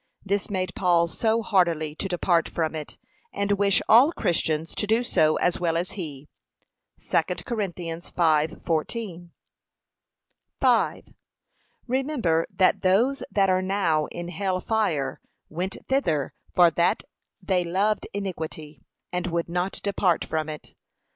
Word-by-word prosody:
This 200 Hz, +1 st, -1 dB
made 185 Hz, -2 st, -2 dB
Paul 170 Hz, -2 st, +3 dB
so 225 Hz, +7 st, 0 dB
heartily 170 Hz, -7 st, +1 dB
to -, -, -3 dB
depart 175 Hz, -2 st, +1 dB
from 160 Hz, -1 st, -1 dB
it, 155 Hz, -2 st, -7 dB, 0.3 s
and 200 Hz, 0 st, -1 dB
wish 200 Hz, -1 st, +3 dB
all 250 Hz, +8 st, +7 dB
Christians 160 Hz, -, -1 dB
to 210 Hz, -, -2 dB
do 225 Hz, +3 st, +2 dB
so 155 Hz, -9 st, +3 dB
as 175 Hz, -, +1 dB
well 165 Hz, -2 st, +1 dB
as 175 Hz, +2 st, -2 dB
he. 150 Hz, -7 st, -7 dB, 0.7 s
(2 -, -, +2 dB, 0.2 s
Cor. 240 Hz, -4 st, -3 dB
5:14) 170 Hz, +1 st, -1 dB, 1.3 s
5. -, -, +2 dB, 0.8 s
Remember 250 Hz, -, 0 dB
that 185 Hz, -, +2 dB
those 225 Hz, +9 st, +2 dB
that 195 Hz, -4 st, +2 dB
are 185 Hz, 0 st, +2 dB
now 185 Hz, -6 st, +1 dB
in 175 Hz, 0 st, -6 dB
hell 185 Hz, 0 st, -1 dB
fire 185 Hz, -10 st, -1 dB, 0.3 s
went 180 Hz, +4 st, -4 dB
thither 165 Hz, -, 0 dB, 0.2 s
for 175 Hz, -2 st, +5 dB
that 170 Hz, +2 st, +1 dB, 0.4 s
they 185 Hz, -2 st, 0 dB
loved 200 Hz, +5 st, 0 dB
iniquity, 160 Hz, -7 st, -6 dB, 0.3 s
and 180 Hz, 0 st, -2 dB
would 170 Hz, -1 st, -1 dB
not 180 Hz, +2 st, -2 dB
depart 195 Hz, -4 st, +1 dB
from 155 Hz, -1 st, -2 dB
it. 150 Hz, -1 st, -9 dB
180 Hz, 130 wpm, -25 LUFS, 165-200 Hz, 1.3 s, all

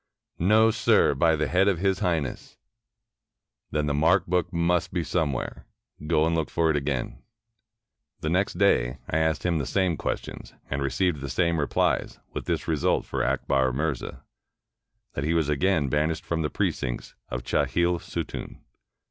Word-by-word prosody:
"No, 110 Hz, +5 st, +5 dB
sir, 110 Hz, -4 st, +3 dB
by 80 Hz, +4 st, +3 dB
the 75 Hz, 0 st, 0 dB
head 95 Hz, +2 st, +3 dB
of 100 Hz, -4 st, +3 dB
His 95 Hz, +1 st, +1 dB
Highness." 80 Hz, -8 st, -2 dB, 1.1 s
"Then 75 Hz, -1 st, -1 dB
the 75 Hz, -, 0 dB
mark 75 Hz, +3 st, +3 dB
book 90 Hz, 0 st, 0 dB
must 85 Hz, 0 st, +1 dB
be 85 Hz, -2 st, -1 dB
somewhere. 75 Hz, -5 st, -2 dB, 0.4 s
Go 80 Hz, -1 st, +3 dB
and 85 Hz, -, +1 dB
look 80 Hz, -2 st, 0 dB
for 80 Hz, -1 st, +2 dB
it -, -, 0 dB
again." 70 Hz, -3 st, -2 dB, 1.0 s
The 75 Hz, -, -1 dB
next 90 Hz, 0 st, 0 dB
day, 65 Hz, -10 st, +3 dB
I 80 Hz, -, 0 dB
asked 80 Hz, 0 st, 0 dB
him 85 Hz, -3 st, +1 dB
the 70 Hz, -, -2 dB
same 95 Hz, -5 st, +1 dB
questions, -, -, -5 dB, 0.2 s
and 70 Hz, +1 st, -1 dB
received 75 Hz, +2 st, 0 dB
the 70 Hz, -, -5 dB
same 85 Hz, +5 st, +1 dB
replies, 70 Hz, -, 0 dB, 0.2 s
with -, -, -4 dB
this -, -, -2 dB
result -, -, +1 dB
for -, -, -2 dB
Akbar 65 Hz, -2 st, +1 dB
Mirza, 75 Hz, -1 st, -3 dB, 0.9 s
that 70 Hz, -, -3 dB
he 80 Hz, +3 st, +1 dB
was 80 Hz, -3 st, +1 dB
again 75 Hz, 0 st, +2 dB
banished 75 Hz, +4 st, 0 dB
from 85 Hz, -1 st, -1 dB
the 75 Hz, -, -1 dB
precincts -, -, -2 dB, 0.2 s
of -, -, -4 dB
Chahil 85 Hz, +6 st, +1 dB
Sutun. -, -, -6 dB
80 Hz, 165 wpm, -26 LUFS, 70-90 Hz, 1.1 s, No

